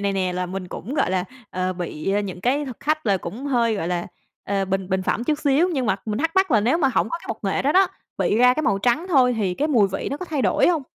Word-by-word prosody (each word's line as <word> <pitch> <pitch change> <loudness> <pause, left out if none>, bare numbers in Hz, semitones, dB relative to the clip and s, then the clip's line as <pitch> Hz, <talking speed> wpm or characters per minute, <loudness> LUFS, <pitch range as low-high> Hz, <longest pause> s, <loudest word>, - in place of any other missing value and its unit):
này 200 -1 0
nè 185 -2 -1
là 180 0 -2
mình 185 0 -6
cũng, 245 +9 -6
gọi 185 - +1
là, 185 -1 0 0.3
ờ, 185 0 -1
bị, 175 0 -3
a, 205 - +2
những 190 -3 -6
cái 275 +6 +1
thực 255 -4 -8
khách 310 -3 -1
là 200 -2 +3
cũng 245 +9 -6
hơi, 235 -4 +2
gọi 170 -3 -2
là, 175 -1 -2 0.4
ờ, 195 -1 0
bình 190 0 -2
bình 190 -1 0
phẩm 235 - -1
chút 300 +1 0
xíu. 305 +4 +3
Nhưng 265 -8 -1
mà 195 -2 +2
mình 210 +1 -2
thắc 325 +2 +1
mắc 380 0 +3
là 215 -4 +4
nếu 255 +10 +2
mà 275 - +3
hổng 265 - +1
có 335 - -2
cái - - -15
bột 225 - -3
nghệ 195 - 0
đó 290 +3 +2
đó, 380 0 +5 0.3
bị 210 - +1
ra 250 +1 +5
cái 310 - -1
màu 195 - +1
trắng 245 - +1
thôi 255 -6 +4
thì 190 -4 0
cái 300 +8 -1
mùi 220 -9 +4
vị 195 - -3
nó 280 - -2
có 365 - -6
thay 300 -6 -2
đổi - - +3
hông? 330 -4 +1
230 Hz, 300 wpm, -23 LUFS, 190-285 Hz, 0.4 s, đó